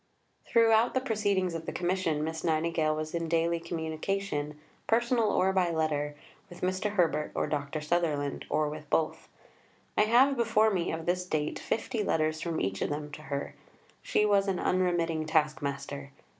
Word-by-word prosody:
Throughout 230 +1 +4
the - - +4
proceedings 205 -7 0
of 165 -1 -5
the - - -1
Commission, 175 -4 0
Miss 160 +1 -4
Nightingale 160 -1 +1
was 155 0 -4
in 170 -1 -2
daily 170 +1 +1
communication 160 -1 -3 0.3
personal, 235 -1 +2
or 190 +1 +2
by 185 -2 +2
letter 150 -3 -1 0.3
with 175 0 -12
Mr. 185 +3 -1
Herbert 165 -5 +1
or - - +1
Dr. 145 +1 -3
Sutherland, 150 -3 0
or 155 0 +1
with 150 0 -7
both. 160 -1 0 0.7
I 210 - +4
have 255 +5 +5
before 220 -2 +3
me, 180 -4 0
of 160 0 -4
this 180 +1 +1
date, 150 -3 -1
fifty 225 0 -2
letters 155 -3 0
from 170 -2 -2
each 95 +1 -2
of - - 0
them 150 0 -4
to 150 - -9
her. 140 -2 -4 0.5
She 210 - +2
was 200 -1 +3
an 190 -2 0
unremitting 170 -3 +1
task 155 -1 +1
master. 140 0 -4
165 Hz, 170 wpm, -29 LUFS, 155-195 Hz, 0.7 s, have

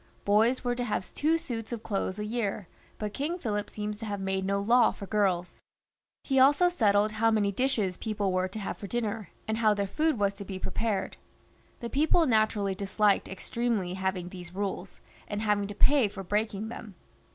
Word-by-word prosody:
Boys 225 +5 +3
were 245 -1 +1
to 245 0 -2
have 210 -5 -3
two 315 +3 +2
suits 240 -9 -5
of 230 -2 -5
clothes 195 -2 -2
a 210 - -3
year, 210 -4 -2 0.3
but 210 -1 -4
King 310 +8 -2
Philip 210 - -2
seems 210 0 -4
to 225 - -5
have 205 -1 -3
made 190 0 -1
no 200 +1 +1
law 235 +4 +5
for 200 - -7
girls. 190 -4 0 0.6
He 270 -1 +2
also 290 +7 +6
settled 210 - +3
how 220 +1 +2
many 210 -2 +2
dishes 210 -5 0
people 210 -3 -1
were 185 0 +1
to 195 - -8
have 205 - -4
for 200 - -6
dinner, 220 -4 -2 0.2
and 220 +1 -1
how 215 -2 +4
their 200 0 0
food 305 +8 0
was 200 -1 +1
to 200 0 -8
be 190 -1 -6
prepared. 205 +1 -2 0.6
The 235 - -4
people 315 +4 +3
naturally 215 -5 +2
disliked 200 +1 +1
extremely 205 -1 -2
having 190 -1 -2
these 180 -1 -10
rules, 200 0 -4 0.3
and 205 +1 -3
having 205 -2 +1
to 205 - -7
pay 270 +1 +4
for 195 -1 -7
breaking 210 +2 -1
them. 220 -4 -9
210 Hz, 195 wpm, -29 LUFS, 195-235 Hz, 0.6 s, also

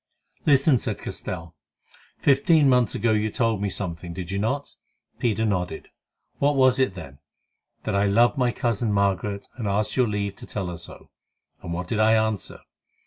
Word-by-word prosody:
"Listen," 140 -2 +5
said - - -3
Castell. 85 -2 -6 0.6
"Fifteen 145 +2 +4
months 125 -4 +3
ago 115 - +1
you 110 0 +1
told 115 -2 0
me 100 - 0
something, 85 -3 -5
did 90 0 -6
you 100 - -1
not?" 135 +7 -2 0.5
Peter 110 -2 +1
nodded. 90 -6 -2 0.5
"What 145 +1 +3
was 130 -1 +4
it, 130 -8 +1
then?" 70 -6 -10 0.6
"That - - -2
I 100 +1 +2
loved 115 +2 +4
my 125 -2 +2
cousin 115 -2 -1
Margaret, 100 0 0
and 115 -5 -3
asked 105 +2 0
your 125 -2 +3
leave 100 -2 -2
to - - -11
tell 95 -4 -4
her 85 - -6
so." 85 - -11 0.5
"And 85 - -7
what 90 +2 -3
did 110 - -1
I 110 +1 +5
answer?" 110 -3 -1
105 Hz, 175 wpm, -24 LUFS, 95-120 Hz, 0.6 s, Listen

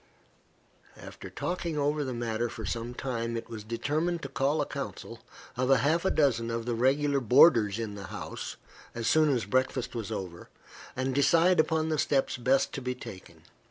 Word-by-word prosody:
After - - -10
talking 170 -3 -3
over 145 +1 +1
the 130 - -4
matter 120 -1 -2
for - - -7
some 120 +1 -4
time, 115 -3 -3
it 115 - -7
was 110 -2 -6
determined 150 +10 -2
to 140 - -5
call 140 +3 0
a 145 - +1
council - - -7 0.4
of 130 +1 0
half 150 +6 +3
a - - +4
dozen 120 -6 +2
of 115 0 -3
the 120 - -1
regular 140 +4 +2
boarders 120 -4 +5
in 110 -3 -4
the 100 -1 -8
house, - - -6 0.4
as 115 -1 -4
soon 155 +4 +4
as 125 -5 +1
breakfast 130 +2 0
was 115 -5 -5
over, 90 -3 -6 0.5
and 130 +1 -1
decide 165 +6 +4
upon 160 0 +2
the 155 -2 0
steps 135 -1 +1
best 130 +3 +1
to - - -4
be 125 0 -3
taken. 95 -6 -11
130 Hz, 180 wpm, -29 LUFS, 115-150 Hz, 0.5 s, boarders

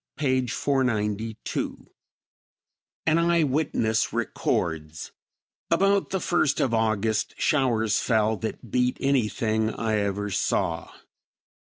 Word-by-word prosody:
p. 130 -4 +1
492. 110 -5 -2 1.2
An 160 +1 +3
eye 170 -1 +3
witness 130 -6 0
records: 80 -1 -2 0.6
"About 195 +1 +2
the 190 - -1
first 175 -6 +1
of 125 - +1
August 110 -1 0
showers 115 -7 +2
fell 110 -1 +2
that 110 0 -6
beat 125 0 +1
anything 110 -4 +1
I 110 -1 -1
ever 100 0 -2
saw. 85 -2 -1
115 Hz, 100 wpm, -25 LUFS, 105-140 Hz, 1.2 s, An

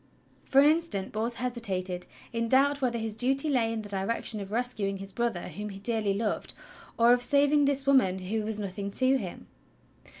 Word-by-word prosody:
For 270 - +3
an - - +5
instant 310 - 0
Bors 225 +2 -2
hesitated, 195 -8 -2 0.3
in 230 0 -1
doubt 275 +3 +3
whether 245 -2 0
his 220 -2 -3
duty 270 +5 +3
lay 230 -4 +1
in 225 -1 -4
the 205 - -10
direction 205 +2 -1
of 195 0 -8
rescuing 220 -4 -1
his 195 0 -6
brother 235 -4 -2
whom 210 +1 -6
he 195 - -8
dearly 210 -1 -1
loved 210 0 -3 0.4
or 235 +1 +6
of 245 - +1
sav 280 +3 +3
ing 290 -1 +4
this 275 -1 +1
woman 260 -10 +3
who 195 +4 -3
was 215 0 -2
nothing 200 0 -4
to 260 +5 +2
him. - - -7
230 Hz, 195 wpm, -28 LUFS, 200-260 Hz, 0.4 s, or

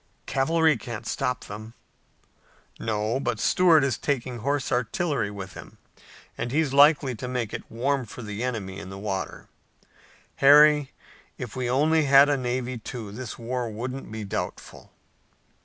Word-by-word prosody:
"Cavalry 160 +2 +2
can't 115 -1 -7
stop 125 -1 -2
them." 110 +3 -9 1.0
"No, 110 +2 -1
but - - -2
Stuart 170 -5 +4
is 130 -5 0
taking 130 -4 -2
horse 140 +3 -1
artillery 125 +1 0
with 95 -2 -8
him, - - -12 0.6
and 120 +1 -2
he's 150 -1 +1
likely 140 -1 +5
to 125 +2 -6
make 125 -4 -3
it - - -6
warm 130 +3 -1
for 120 - -9
the 105 0 -5
enemy 100 -6 -4
in 95 - -8
the 95 - -8
water. 95 -2 -4 0.9
Harry, 150 0 +6 0.5
if 120 -4 -7
we 125 -2 -2
only 155 +4 +3
had 140 +1 +7
a 145 - +3
navy, 125 -1 -3
too, 110 -2 -7
this 120 +2 -7
war 120 0 -3
wouldn't 125 +3 -6
be 110 -1 -5
doubtful." 100 - -6
125 Hz, 150 wpm, -25 LUFS, 110-140 Hz, 1.0 s, had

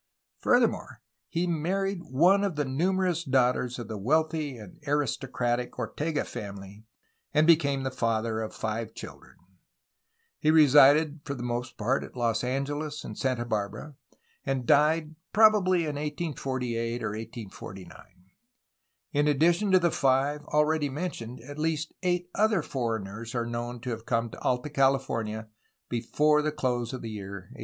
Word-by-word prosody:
Furthermore, - - +2 0.3
he 170 +2 -1
married 185 +4 -1
one 180 +10 +4
of 195 -5 -1
the 145 -1 0
numerous 175 +5 0
daughters 125 -3 +1
of 120 - -6
the 110 -2 -5
wealthy 155 +3 0
and 105 -5 -12
aristocratic 125 -4 -1
Ortega 155 0 -2
family, 100 +1 -8 0.5
and 150 +1 +5
became 140 -5 +4
the 130 - -2
father 115 -3 0
of 110 - -4
five 110 0 -4
children. - - -10 1.0
He 155 - +2
resided 150 0 +6
for 140 - -4
the 120 - -6
most 120 +1 -3
part 120 +5 0
at - - -11
Los 115 -2 0
Angeles 145 +4 -2
and 105 - -7
Santa 125 -1 -1
Barbara, 110 +6 -3 0.5
and 135 -2 -1
died 155 +3 +3 0.2
probably 205 -5 +5
in 150 -3 -2
1848 130 -6 -3
or - - -1
1849. 105 -3 -8 1.2
In 145 0 +2
addition 170 +7 +3
to 190 - +6
the 170 -2 +2
five 140 +2 +1
already 150 0 +2
mentioned, 130 -6 -5
at 145 +1 -9
least 155 0 -1
eight 175 -1 0
other 215 -5 +2
foreigners 115 -3 -4
are 120 -1 0
known 120 +1 -4
to 125 - -4
have 115 0 -6
come 115 -1 0
to - - -11
Alta 125 +4 -1
California 135 -6 0 0.4
before 150 +6 +2
the 155 0 0
close 125 -5 -1
of 130 -2 -6
the 115 - -5
year 100 -2 -7 0.2
1818. - - -15
135 Hz, 150 wpm, -28 LUFS, 120-155 Hz, 1.2 s, resided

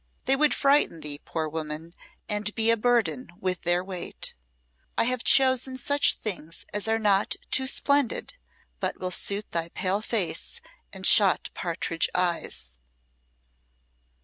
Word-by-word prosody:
They 270 - +4
would 300 +2 +3
frighten 275 - +3
thee, 145 -1 -4
poor 160 -1 -3
woman, 155 +1 -5 0.3
and 210 0 -1
be 225 0 +4
a - - +4
burden 245 +2 0
with 185 -1 -2
their 175 +1 +1
weight. 185 -2 -5 0.6
I - - +3
have 250 0 0
chosen 260 -1 +4
such 285 +3 +2
things 170 -6 -4
as 210 +1 -1
are 225 0 +2
not 205 -2 +2 0.2
too 265 0 +1
splendid, 280 -1 +1 0.5
but - - -3
will 185 0 -3
suit 200 +3 -1
thy 170 0 -2
pale 190 +4 -1
face 185 -8 -1 0.3
and 190 -1 -6
shot 200 -3 +5
partridge 165 -1 -2
eyes." 170 - -2
200 Hz, 140 wpm, -26 LUFS, 170-245 Hz, 0.6 s, shot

